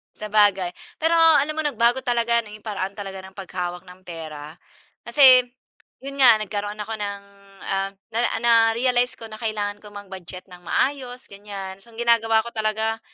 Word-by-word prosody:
Sabagay. 205 Hz, -3 st, +2 dB, 0.3 s
Pero 330 Hz, +1 st, +3 dB
alam 310 Hz, -2 st, +5 dB
mo 315 Hz, -, -1 dB
nagbago 240 Hz, -3 st, +2 dB
talaga 235 Hz, -1 st, +2 dB
no 210 Hz, -, -12 dB
'yong 215 Hz, -, -12 dB
paraan 200 Hz, -3 st, -4 dB
talaga 195 Hz, -1 st, -7 dB
ng 190 Hz, -, -13 dB
paghawak 180 Hz, -2 st, -5 dB
ng 185 Hz, 0 st, -16 dB
pera. 155 Hz, -3 st, -8 dB, 0.5 s
Kasi 255 Hz, +1 st, +7 dB, 0.6 s
'yon 275 Hz, 0 st, -4 dB
nga 235 Hz, -4 st, +8 dB
nagkaroon 205 Hz, 0 st, -4 dB
ako 215 Hz, +1 st, -5 dB
ng, 200 Hz, -2 st, -4 dB, 0.4 s
ah, 195 Hz, 0 st, -1 dB, 0.2 s
na 225 Hz, -, 0 dB, 0.2 s
na-realized 235 Hz, +2 st, +3 dB
ko 230 Hz, -, -10 dB
na 215 Hz, 0 st, -10 dB
kailangan 205 Hz, -2 st, -3 dB
ko 210 Hz, -, -12 dB
mag-budget 190 Hz, -3 st, -10 dB
ng 180 Hz, -2 st, -14 dB
maayos 255 Hz, +4 st, -2 dB
ganyan, 195 Hz, -1 st, -9 dB
so 235 Hz, -, -19 dB
ang 225 Hz, -, -17 dB
ginagawa 225 Hz, -2 st, +3 dB
ko 235 Hz, -, -7 dB
talaga 220 Hz, 0 st, -1 dB
215 Hz, 165 wpm, -23 LUFS, 195-235 Hz, 0.6 s, nga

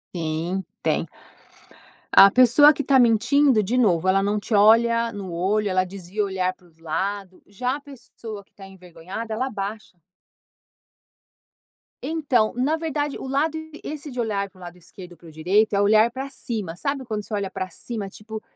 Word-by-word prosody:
Sim, 170 Hz, +3 st, -2 dB, 0.2 s
tem. -, -, 0 dB, 1.1 s
A 195 Hz, -, +10 dB
pessoa 255 Hz, +6 st, +6 dB
que 290 Hz, -, -4 dB
está 270 Hz, 0 st, +4 dB
mentindo 245 Hz, +1 st, +3 dB
de 220 Hz, +6 st, -2 dB
novo, 185 Hz, -8 st, +2 dB
ela 195 Hz, +1 st, +3 dB
não 205 Hz, +1 st, 0 dB
te 215 Hz, -, -6 dB
olha 230 Hz, +3 st, +4 dB
no 195 Hz, -5 st, -7 dB
olho, 200 Hz, +5 st, 0 dB
ela 185 Hz, -1 st, +1 dB
desvia 190 Hz, +2 st, -5 dB
o 205 Hz, -, 0 dB
olhar 185 Hz, -1 st, -1 dB
para 180 Hz, -1 st, -24 dB
os 165 Hz, -1 st, -28 dB
lado. 185 Hz, +4 st, -4 dB
Já 250 Hz, +7 st, -3 dB
a -, -, -15 dB
pessoa 235 Hz, -6 st, -10 dB
que -, -, -40 dB
está 195 Hz, -1 st, -13 dB
envergonhada 190 Hz, +4 st, -8 dB
ela 250 Hz, +4 st, -1 dB
abaixa 210 Hz, -4 st, -6 dB, 2.0 s
então, 275 Hz, -9 st, 0 dB
na 265 Hz, +6 st, +1 dB
verdade 295 Hz, -3 st, -3 dB
o -, -, -7 dB
lado, 295 Hz, +4 st, 0 dB, 0.3 s
esse 300 Hz, 0 st, -7 dB
de 250 Hz, -, -7 dB
olhar 205 Hz, -4 st, -1 dB
para 190 Hz, -, -24 dB
o -, -, -16 dB
lado 175 Hz, 0 st, -10 dB
esquerdo 180 Hz, +1 st, -13 dB
e -, -, -16 dB
para 170 Hz, -, -17 dB
o -, -, -12 dB
direito 190 Hz, +8 st, +1 dB
é 200 Hz, -, +2 dB
olhar 215 Hz, +3 st, +4 dB
pra 265 Hz, +3 st, -6 dB
cima, 215 Hz, -10 st, -5 dB
sabe 275 Hz, +6 st, -3 dB
quando 215 Hz, -3 st, -4 dB
você 215 Hz, -, -10 dB
olha 200 Hz, -2 st, -2 dB
pra 185 Hz, -, -5 dB
cima 215 Hz, 0 st, -6 dB
tipo, 215 Hz, +2 st, -9 dB
210 Hz, 185 wpm, -23 LUFS, 185-250 Hz, 2.0 s, A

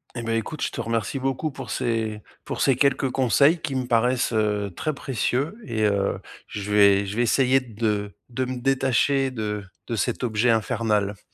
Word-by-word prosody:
Eh 120 Hz, -, -4 dB
beh, 115 Hz, 0 st, 0 dB
écoute, 150 Hz, +6 st, -7 dB
je -, -, -1 dB
te -, -, -4 dB
remercie 115 Hz, +3 st, -2 dB
beaucoup 135 Hz, +4 st, -1 dB
pour -, -, -8 dB
ces 110 Hz, -3 st, -2 dB, 0.2 s
pour -, -, -4 dB
ces 135 Hz, -, +4 dB
quelques 135 Hz, 0 st, +2 dB
conseils 140 Hz, +6 st, +3 dB
qui 140 Hz, -4 st, -3 dB
me 130 Hz, -1 st, -1 dB
paraissent, 125 Hz, +1 st, +2 dB
heu, 105 Hz, -2 st, 0 dB
très 155 Hz, -, -2 dB
précieux 135 Hz, -, -1 dB
et 110 Hz, -3 st, -2 dB
heu, 100 Hz, -2 st, +1 dB, 0.3 s
je 105 Hz, 0 st, -5 dB
vais 100 Hz, -1 st, +5 dB
je 100 Hz, +1 st, -5 dB
vais 120 Hz, -, +1 dB
essayer 130 Hz, +2 st, +3 dB
de 105 Hz, -4 st, -3 dB
de 130 Hz, +1 st, -2 dB
me 130 Hz, 0 st, -4 dB
détacher 135 Hz, +1 st, +2 dB
de 105 Hz, -4 st, -4 dB, 0.2 s
de 115 Hz, -, -2 dB
cet 110 Hz, +4 st, -1 dB
objet 115 Hz, +1 st, +1 dB
infernal. 105 Hz, -3 st, +1 dB
115 Hz, 185 wpm, -24 LUFS, 105-130 Hz, 0.3 s, vais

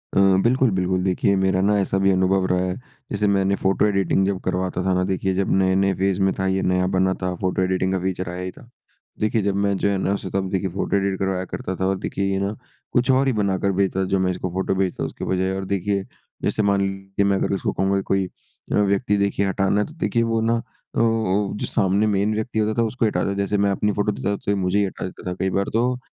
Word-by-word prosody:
अ, -, -, +4 dB, 0.2 s
बिल्कुल, 130 Hz, +2 st, +3 dB
बिल्कुल। 95 Hz, 0 st, 0 dB
देखिए 95 Hz, +1 st, +2 dB
मेरा 95 Hz, -1 st, +2 dB
ना 105 Hz, +2 st, +3 dB
ऐसा 95 Hz, 0 st, 0 dB
भी 95 Hz, 0 st, +3 dB
अनुभव 95 Hz, 0 st, +2 dB
रहा 90 Hz, 0 st, +1 dB
है 90 Hz, 0 st, -2 dB, 0.4 s
जैसे 105 Hz, 0 st, +1 dB
मैंने 100 Hz, -1 st, +2 dB
फोटो 95 Hz, +1 st, +1 dB
एडिटिंग 95 Hz, -2 st, +2 dB
जब 100 Hz, -2 st, -1 dB
करवाता 95 Hz, 0 st, -2 dB
था 95 Hz, -, +2 dB
ना 90 Hz, 0 st, +1 dB
देखिए 95 Hz, 0 st, -1 dB
जब 95 Hz, 0 st, 0 dB
नए-नए 95 Hz, +1 st, +2 dB
फेज़ 95 Hz, +1 st, 0 dB
में 95 Hz, 0 st, +3 dB
था, 95 Hz, -, 0 dB
ये 95 Hz, 0 st, +1 dB
नया 90 Hz, 0 st, +1 dB
बना 95 Hz, 0 st, +2 dB
था 90 Hz, 0 st, -1 dB
फोटो 95 Hz, 0 st, 0 dB
एडिटिंग 95 Hz, 0 st, +1 dB
का 95 Hz, -, 0 dB
फ़ीचर 95 Hz, 0 st, -3 dB
आया 90 Hz, +1 st, -5 dB
ही 95 Hz, -, -4 dB
था। 120 Hz, -, -17 dB, 0.5 s
देखिए 110 Hz, +1 st, +1 dB
जब 100 Hz, -1 st, 0 dB
मैं 100 Hz, 0 st, +1 dB
जो 100 Hz, -, +1 dB
है 100 Hz, -, +1 dB
ना 95 Hz, +1 st, 0 dB
उसे 100 Hz, -1 st, -4 dB
तब 95 Hz, -1 st, -1 dB
देखिए 95 Hz, 0 st, -1 dB
फोटो 95 Hz, +2 st, -2 dB
एडिट 100 Hz, -1 st, 0 dB
करवाया 95 Hz, -1 st, -1 dB
करता 95 Hz, +1 st, -5 dB
था 95 Hz, -, -2 dB
और 95 Hz, 0 st, 0 dB
देखिए 100 Hz, -, -2 dB
ये 95 Hz, -, 0 dB
ना 100 Hz, +2 st, -2 dB, 0.4 s
कुछ 125 Hz, +2 st, +2 dB
और 135 Hz, +1 st, +3 dB
ही 130 Hz, -, +2 dB
बनाकर 100 Hz, -2 st, 0 dB
भेजता 95 Hz, -1 st, +1 dB
जो 95 Hz, -, +3 dB
मैं 95 Hz, 0 st, +1 dB
इसको 90 Hz, 0 st, -4 dB
फोटो 95 Hz, +1 st, 0 dB
भेजता 95 Hz, -1 st, -1 dB
हूँ -, -, -1 dB
उसके -, -, -7 dB
बजाए 95 Hz, 0 st, 0 dB
और 95 Hz, 0 st, -4 dB
देखिए 100 Hz, +1 st, -1 dB, 0.4 s
जैसे -, -, +1 dB
मान 100 Hz, -1 st, +2 dB
लीजिए 95 Hz, 0 st, -2 dB
मैं 100 Hz, -1 st, +2 dB
अगर 100 Hz, -, 0 dB
उसको 95 Hz, -, -1 dB
कहूँगा 95 Hz, +1 st, +1 dB
कोई 95 Hz, -1 st, +2 dB, 0.4 s
व्यक्ति 105 Hz, +1 st, +2 dB
देखिए 100 Hz, 0 st, +1 dB
हटाना 95 Hz, +1 st, +1 dB
है -, -, 0 dB
तो -, -, -13 dB
देखिए 115 Hz, -2 st, +1 dB
वो 115 Hz, -1 st, 0 dB
ना 115 Hz, +1 st, +2 dB
अ -, -, -2 dB, 0.4 s
अ, 110 Hz, -4 st, +1 dB
जो -, -, -3 dB
सामने 100 Hz, +2 st, +2 dB
मेन 105 Hz, +1 st, +1 dB
व्यक्ति 110 Hz, +1 st, -2 dB
होता 110 Hz, 0 st, +1 dB
था -, -, +3 dB
उसको 115 Hz, +2 st, -1 dB
हटा 105 Hz, -, 0 dB
देता। 100 Hz, -, -1 dB
जैसे 100 Hz, +1 st, 0 dB
मैं 100 Hz, 0 st, +2 dB
अपनी 105 Hz, +2 st, 0 dB
फोटो 105 Hz, +1 st, 0 dB
देता 100 Hz, 0 st, -2 dB
तो 100 Hz, -, -3 dB
ये -, -, +2 dB
मुझे 95 Hz, +1 st, 0 dB
ही 100 Hz, -, +3 dB
हटा 95 Hz, -, -5 dB
देता 90 Hz, 0 st, -6 dB
कई 95 Hz, -, +1 dB
बार 100 Hz, +1 st, 0 dB
तो, 125 Hz, +2 st, +1 dB
95 Hz, 255 wpm, -22 LUFS, 95-100 Hz, 0.5 s, अ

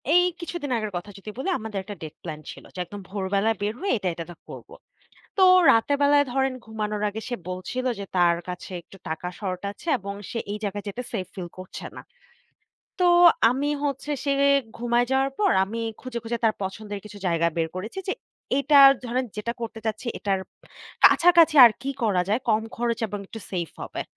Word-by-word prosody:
এই 355 Hz, -, +7 dB, 0.2 s
কিছুদিন 340 Hz, -5 st, -5 dB
আগের 215 Hz, -2 st, -3 dB
কথা 180 Hz, +4 st, -7 dB
যদি 205 Hz, +2 st, -9 dB
বলি, 325 Hz, +9 st, -2 dB
আমাদের 215 Hz, -2 st, -4 dB
১ 190 Hz, -, -17 dB
টা -, -, -5 dB
ডেট 155 Hz, -, -8 dB
প্ল্যান 155 Hz, -3 st, -6 dB
ছিল -, -, -12 dB
যে 185 Hz, -, -6 dB
একদম 205 Hz, +3 st, -9 dB
ভোরবেলায় 200 Hz, +2 st, 0 dB
বের 210 Hz, +1 st, 0 dB
হয়ে 390 Hz, +2 st, 0 dB
এটা, 195 Hz, -3 st, -3 dB
এটা 165 Hz, 0 st, -6 dB
তা 175 Hz, -, -9 dB
করবো। -, -, -10 dB, 0.6 s
তো 385 Hz, -, +3 dB, 0.3 s
রাতের 230 Hz, +6 st, +3 dB
বেলায় 285 Hz, 0 st, +5 dB
ধরেন 265 Hz, 0 st, +1 dB
ঘুমানোর 215 Hz, -1 st, -3 dB
আগে 215 Hz, +2 st, -5 dB
সে 245 Hz, -, -2 dB
বলছিল 185 Hz, +8 st, -4 dB
যে, 200 Hz, -, -4 dB
তার 175 Hz, -1 st, +4 dB
কাছে 180 Hz, +1 st, -6 dB
একটু 195 Hz, -, -16 dB
টাকা 160 Hz, +3 st, -3 dB
শর্ট 185 Hz, -3 st, -3 dB
আছে, 205 Hz, -, -17 dB
এবং 200 Hz, +1 st, -6 dB, 0.2 s
সে 230 Hz, -, -3 dB
এই 210 Hz, -, -3 dB
জায়গায় 205 Hz, 0 st, -3 dB
যেতে 245 Hz, +5 st, -5 dB
সেফ 190 Hz, -5 st, -2 dB
ফিল 180 Hz, -2 st, -6 dB
করছে 185 Hz, 0 st, -8 dB
না। -, -, -6 dB, 1.0 s
তো 360 Hz, -, +5 dB, 0.4 s
আমি 275 Hz, +4 st, -1 dB, 0.2 s
হচ্ছে 280 Hz, +1 st, -2 dB
সে 280 Hz, -, +1 dB, 0.5 s
ঘুমায়ে 240 Hz, +1 st, +1 dB
যাওয়ার 270 Hz, +1 st, +2 dB
পর 405 Hz, -2 st, +3 dB
আমি 225 Hz, +4 st, -5 dB, 0.2 s
খুঁজে, 255 Hz, -2 st, -5 dB
খুঁজে 235 Hz, +1 st, -2 dB
তার 220 Hz, -1 st, +4 dB
পছন্দের 205 Hz, +2 st, -5 dB
কিছু 205 Hz, -1 st, -10 dB
জায়গা 170 Hz, -1 st, +2 dB
বের 165 Hz, -1 st, 0 dB
করেছি। 215 Hz, -, -5 dB
যে -, -, +2 dB, 0.5 s
এটা 285 Hz, +1 st, +5 dB, 0.3 s
ধরেন 250 Hz, +2 st, -1 dB
যেটা 220 Hz, +3 st, -2 dB
করতে 230 Hz, -1 st, -5 dB
চাচ্ছি, 220 Hz, +3 st, -3 dB
এটার 195 Hz, -2 st, 0 dB, 0.6 s
কাছাকাছি 335 Hz, -2 st, +7 dB
আর 235 Hz, -, +9 dB
কি 275 Hz, -, -2 dB
করা 195 Hz, -5 st, +2 dB
যায়, 215 Hz, +5 st, +1 dB
কম 220 Hz, 0 st, +3 dB
খরচ 235 Hz, -1 st, -1 dB
এবং 205 Hz, 0 st, -5 dB
একটু 225 Hz, -, -9 dB
সেফ 175 Hz, -3 st, -3 dB
হবে। -, -, -4 dB
215 Hz, 195 wpm, -25 LUFS, 195-255 Hz, 1.0 s, আর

